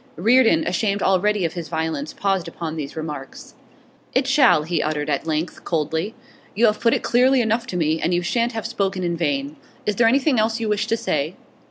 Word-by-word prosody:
Reardon, 255 Hz, -, +4 dB
ashamed 200 Hz, -8 st, 0 dB
already 195 Hz, 0 st, +2 dB
of 165 Hz, -, -2 dB
his 170 Hz, -2 st, -6 dB
violence, 160 Hz, -2 st, -3 dB
paused 195 Hz, -3 st, -1 dB
upon 160 Hz, -2 st, -5 dB
these 145 Hz, -3 st, -6 dB
remarks. 150 Hz, -4 st, -7 dB, 0.6 s
'It 260 Hz, +1 st, +3 dB
shall,' 265 Hz, -, +4 dB
he 165 Hz, 0 st, -1 dB
uttered 150 Hz, -1 st, -2 dB
at 140 Hz, +3 st, -2 dB
length, 160 Hz, +2 st, -3 dB
coldly. 160 Hz, +6 st, -2 dB, 0.4 s
'You 230 Hz, +4 st, +4 dB
have 215 Hz, -1 st, +2 dB
put 230 Hz, -1 st, +3 dB
it -, -, -3 dB
clearly 255 Hz, +2 st, +3 dB
enough 230 Hz, +1 st, 0 dB
to 185 Hz, -, -4 dB
me, 160 Hz, -1 st, 0 dB
and 170 Hz, -, 0 dB
you 175 Hz, 0 st, +1 dB
shan't 235 Hz, +5 st, 0 dB
have 225 Hz, -1 st, -4 dB
spoken 195 Hz, -5 st, -2 dB
in 170 Hz, -1 st, -1 dB
vain. 275 Hz, -, -2 dB, 0.3 s
Is 210 Hz, -1 st, -1 dB
there 230 Hz, -, +5 dB
anything 265 Hz, +1 st, +3 dB
else 220 Hz, +2 st, +1 dB
you 225 Hz, -, -2 dB
wish 210 Hz, 0 st, 0 dB
to 230 Hz, +1 st, +1 dB
say? 155 Hz, -4 st, -2 dB
195 Hz, 205 wpm, -22 LUFS, 160-230 Hz, 0.6 s, there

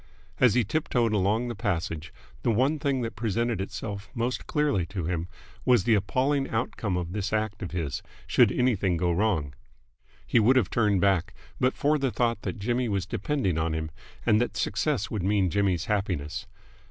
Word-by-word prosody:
As 125 Hz, -4 st, +5 dB
he 125 Hz, -, +4 dB
tip 155 Hz, +10 st, -2 dB
toed 115 Hz, -3 st, +2 dB
along 105 Hz, +4 st, +1 dB
the 120 Hz, -, -3 dB
passage, 85 Hz, -6 st, -2 dB, 0.3 s
the -, -, 0 dB
one 130 Hz, +7 st, +2 dB
thing 140 Hz, -3 st, 0 dB
that 115 Hz, -3 st, -4 dB
presented 115 Hz, 0 st, -1 dB
itself 100 Hz, 0 st, -5 dB
most 120 Hz, +2 st, -2 dB
clearly 150 Hz, -, +1 dB
to 90 Hz, -3 st, -4 dB
him 85 Hz, 0 st, -2 dB, 0.4 s
was 125 Hz, -6 st, +4 dB
the 115 Hz, -, +3 dB
appalling 135 Hz, +7 st, +1 dB
outcome 110 Hz, -4 st, -1 dB
of 85 Hz, -1 st, -3 dB
this 100 Hz, -1 st, -2 dB
act 110 Hz, -1 st, -1 dB
of 90 Hz, -, -4 dB
his, 80 Hz, -6 st, -3 dB, 0.2 s
should -, -, +4 dB
anything 105 Hz, -8 st, +1 dB
go 85 Hz, +1 st, +1 dB
wrong. 85 Hz, -7 st, 0 dB, 0.7 s
He 120 Hz, -, +3 dB
would 120 Hz, +5 st, +5 dB
have 120 Hz, -8 st, +2 dB
turned 105 Hz, -5 st, +2 dB
back, 95 Hz, -4 st, +2 dB, 0.2 s
but 130 Hz, +1 st, +2 dB
for 150 Hz, +1 st, +2 dB
the 135 Hz, -1 st, +1 dB
thought 115 Hz, -2 st, 0 dB
that 95 Hz, -, -4 dB
Jimmy 120 Hz, +4 st, 0 dB
was 100 Hz, -4 st, -1 dB
depending 95 Hz, -, -1 dB
on 80 Hz, 0 st, 0 dB
him 80 Hz, -1 st, -3 dB, 0.3 s
and 110 Hz, 0 st, +4 dB
that 110 Hz, -3 st, -2 dB
success 105 Hz, +3 st, 0 dB
would 105 Hz, -, -2 dB
mean 95 Hz, -1 st, +2 dB
Jimmy's 95 Hz, -4 st, +1 dB
happiness. 95 Hz, -8 st, -2 dB
105 Hz, 185 wpm, -27 LUFS, 95-120 Hz, 0.7 s, As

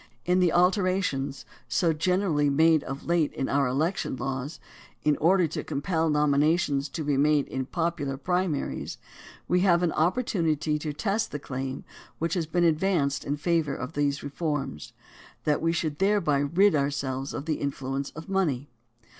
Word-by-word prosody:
In 180 Hz, +1 st, +3 dB
the 180 Hz, -2 st, +3 dB
alterations; 180 Hz, -7 st, +1 dB, 0.2 s
so 165 Hz, -3 st, +2 dB
generally 160 Hz, -2 st, +1 dB
made 160 Hz, +2 st, +4 dB
of 135 Hz, +1 st, -6 dB
late 170 Hz, -3 st, +2 dB
in 135 Hz, -, -2 dB
our 140 Hz, -1 st, +2 dB
election 150 Hz, +5 st, -1 dB
laws 135 Hz, +4 st, -4 dB, 0.4 s
in 150 Hz, -1 st, +3 dB
order 180 Hz, +3 st, +4 dB
to 155 Hz, -1 st, -4 dB
compel 160 Hz, +2 st, -1 dB
nominations 150 Hz, 0 st, +2 dB
to 155 Hz, +3 st, -4 dB
be 145 Hz, -2 st, 0 dB
made 145 Hz, 0 st, +3 dB
in 130 Hz, -1 st, -4 dB
popular 160 Hz, -3 st, -2 dB
primaries; 180 Hz, 0 st, -2 dB, 0.5 s
we 180 Hz, -, +3 dB
have 180 Hz, -2 st, +3 dB
an 170 Hz, -, +2 dB
opportunity 165 Hz, -, 0 dB
to 150 Hz, 0 st, -3 dB
test 195 Hz, +9 st, -1 dB
the -, -, -3 dB
claim 135 Hz, -1 st, -5 dB, 0.3 s
which 165 Hz, 0 st, -1 dB
has 170 Hz, -4 st, -1 dB
been 175 Hz, +2 st, +1 dB
ad 160 Hz, -2 st, +3 dB
vanced 160 Hz, -8 st, +1 dB
in 145 Hz, +1 st, -2 dB
favor 160 Hz, -2 st, 0 dB
of 130 Hz, +4 st, -6 dB
these 145 Hz, -1 st, 0 dB
reforms, 145 Hz, -, -3 dB, 0.5 s
that 150 Hz, -1 st, +1 dB
we 165 Hz, -, +2 dB
should 160 Hz, -3 st, -2 dB
thereby 195 Hz, -8 st, +2 dB
rid 175 Hz, +8 st, +3 dB
ourselves 140 Hz, -2 st, -1 dB
of 140 Hz, -, -5 dB
the 155 Hz, -2 st, -1 dB
influence 135 Hz, 0 st, -3 dB
of 160 Hz, 0 st, -8 dB
money. 155 Hz, -9 st, 0 dB
155 Hz, 165 wpm, -27 LUFS, 140-175 Hz, 0.5 s, made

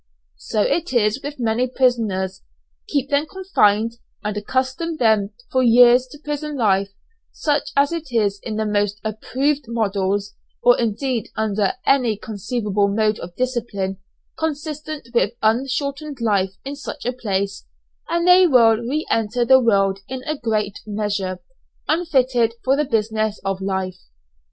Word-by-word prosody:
So 210 Hz, -, 0 dB
it 335 Hz, -5 st, -1 dB
is 225 Hz, +2 st, +2 dB
with 290 Hz, -1 st, -7 dB
many 235 Hz, +2 st, +1 dB
prisoners, 220 Hz, -8 st, 0 dB, 0.5 s
keep 280 Hz, -1 st, -1 dB
them 285 Hz, +2 st, +2 dB
confined, 230 Hz, -, +1 dB, 0.3 s
and 210 Hz, 0 st, -2 dB
accustom 260 Hz, +9 st, -2 dB
them 220 Hz, -5 st, +3 dB, 0.2 s
for 260 Hz, -, +2 dB
years 245 Hz, +1 st, +6 dB
to 260 Hz, -, -12 dB
prison 295 Hz, 0 st, -4 dB
life, 200 Hz, -4 st, +2 dB, 0.4 s
such 295 Hz, -1 st, -1 dB
as 280 Hz, +2 st, +4 dB
it 330 Hz, -2 st, -4 dB
is 205 Hz, -4 st, +1 dB
in 220 Hz, -, -5 dB
the 220 Hz, 0 st, -1 dB
most 205 Hz, -1 st, 0 dB
approved 265 Hz, +6 st, -1 dB
"models," 205 Hz, -3 st, -1 dB, 0.3 s
or 245 Hz, 0 st, +7 dB
indeed 235 Hz, +1 st, -1 dB
under 210 Hz, -2 st, 0 dB
any 245 Hz, -6 st, +3 dB
conceivable 210 Hz, -1 st, -1 dB
mode 215 Hz, +1 st, +1 dB
of 175 Hz, 0 st, -9 dB
discipline 230 Hz, -7 st, -2 dB, 0.4 s
consistent 305 Hz, -3 st, -4 dB
with 235 Hz, -2 st, +2 dB
unshortened 275 Hz, +5 st, -1 dB
life 195 Hz, -4 st, +1 dB
in 280 Hz, +1 st, -4 dB
such 285 Hz, 0 st, -8 dB
a 245 Hz, -, 0 dB
place, 200 Hz, -5 st, -3 dB, 0.4 s
and 340 Hz, +1 st, +1 dB
they 360 Hz, 0 st, +7 dB
will 230 Hz, -6 st, +5 dB
re 260 Hz, +7 st, -2 dB
enter 225 Hz, +2 st, +1 dB
the 260 Hz, +1 st, +7 dB
world 195 Hz, -5 st, +2 dB
in 260 Hz, 0 st, -6 dB
a 310 Hz, 0 st, -2 dB
great 215 Hz, -6 st, -2 dB
measure, 205 Hz, -3 st, -2 dB, 0.4 s
unfitted 260 Hz, -8 st, +2 dB
for 265 Hz, +1 st, +3 dB
the 300 Hz, +1 st, +1 dB
business 220 Hz, -3 st, -1 dB
of 195 Hz, -1 st, -2 dB
life. 190 Hz, -1 st, -2 dB
230 Hz, 145 wpm, -21 LUFS, 205-275 Hz, 0.5 s, or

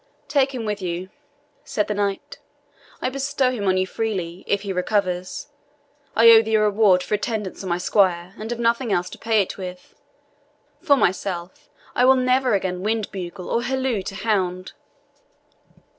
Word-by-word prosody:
"Take 275 Hz, -2 st, +1 dB
him 235 Hz, -3 st, -4 dB
with 210 Hz, -1 st, -3 dB
you," 180 Hz, +1 st, -4 dB, 0.5 s
said 210 Hz, -, -1 dB
the 210 Hz, -, -1 dB
knight. 200 Hz, -1 st, -3 dB, 0.6 s
"I -, -, +1 dB
bestow 275 Hz, -1 st, 0 dB
him 210 Hz, -6 st, -3 dB
on 185 Hz, 0 st, +3 dB
you 185 Hz, -, +2 dB
freely, 185 Hz, -4 st, -3 dB
if 200 Hz, 0 st, 0 dB
he 200 Hz, -2 st, -3 dB
recovers. 185 Hz, +2 st, -1 dB, 0.7 s
I 230 Hz, +1 st, +8 dB
owe 225 Hz, -1 st, +9 dB
thee 220 Hz, 0 st, 0 dB
a 215 Hz, -, +4 dB
reward 205 Hz, -3 st, +4 dB
for -, -, -4 dB
attendance 210 Hz, -2 st, -2 dB
on 190 Hz, -, -5 dB
my 175 Hz, -, +1 dB
squire, 180 Hz, -1 st, +1 dB
and 215 Hz, +1 st, -6 dB
have 240 Hz, 0 st, -3 dB
nothing 235 Hz, 0 st, +1 dB
else 180 Hz, -1 st, 0 dB
to -, -, -10 dB
pay 220 Hz, -3 st, +2 dB
it 190 Hz, -, -9 dB
with. 180 Hz, -1 st, -8 dB, 0.9 s
For 290 Hz, -5 st, +4 dB
myself, 180 Hz, -3 st, -2 dB, 0.2 s
I 250 Hz, -, +3 dB
will 265 Hz, +1 st, +7 dB
never 255 Hz, -2 st, +2 dB
again 185 Hz, -2 st, -2 dB
wind 215 Hz, +1 st, -1 dB
bugle 180 Hz, -1 st, -6 dB
or 235 Hz, -, 0 dB
halloo 260 Hz, -3 st, -1 dB
to 195 Hz, -, -6 dB
hound!" 190 Hz, -4 st, -1 dB
205 Hz, 175 wpm, -22 LUFS, 185-230 Hz, 0.9 s, owe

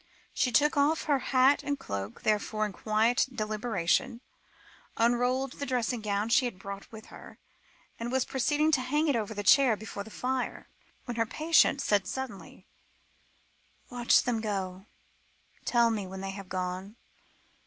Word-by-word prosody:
She 250 Hz, -, +1 dB
took 295 Hz, +4 st, +3 dB
off 295 Hz, +3 st, +2 dB
her 285 Hz, -3 st, +1 dB
hat 265 Hz, +2 st, +4 dB
and 285 Hz, -1 st, -2 dB
cloak, 100 Hz, -, -6 dB
therefore, 215 Hz, 0 st, 0 dB
with 205 Hz, -3 st, -8 dB
quiet 225 Hz, +5 st, +3 dB
deliberation, 220 Hz, +1 st, -1 dB, 0.8 s
unrolled 245 Hz, +3 st, +1 dB
the 285 Hz, -, -2 dB
dressing 245 Hz, -2 st, -1 dB
gown 210 Hz, +1 st, -1 dB
she 255 Hz, +2 st, +4 dB
had 240 Hz, -6 st, -4 dB
brought 195 Hz, +1 st, -8 dB
with 220 Hz, -1 st, -10 dB
her, -, -, -12 dB, 0.6 s
and 235 Hz, +1 st, -4 dB
was 260 Hz, -1 st, +1 dB
proceeding 295 Hz, +4 st, +1 dB
to 275 Hz, -4 st, +3 dB
hang 295 Hz, +5 st, 0 dB
it 280 Hz, -, +2 dB
over 220 Hz, -1 st, -3 dB
a -, -, -2 dB
chair 250 Hz, +1 st, +5 dB
before 200 Hz, -1 st, -7 dB
the 220 Hz, -, -12 dB
fire, 255 Hz, +2 st, -3 dB, 0.4 s
when 240 Hz, -2 st, -5 dB
her 230 Hz, -1 st, +1 dB
patient 310 Hz, -1 st, +3 dB
said 200 Hz, -3 st, +1 dB
suddenly: 250 Hz, -4 st, -7 dB, 1.3 s
"Watch 240 Hz, -1 st, +3 dB
them 235 Hz, -3 st, -1 dB
go; 195 Hz, -2 st, -4 dB, 0.8 s
tell 235 Hz, -1 st, +3 dB
me 205 Hz, -4 st, -3 dB
when 190 Hz, +1 st, -7 dB
they 195 Hz, 0 st, -4 dB
have 195 Hz, -1 st, -9 dB
gone. 185 Hz, +3 st, -4 dB
230 Hz, 155 wpm, -29 LUFS, 205-260 Hz, 1.3 s, chair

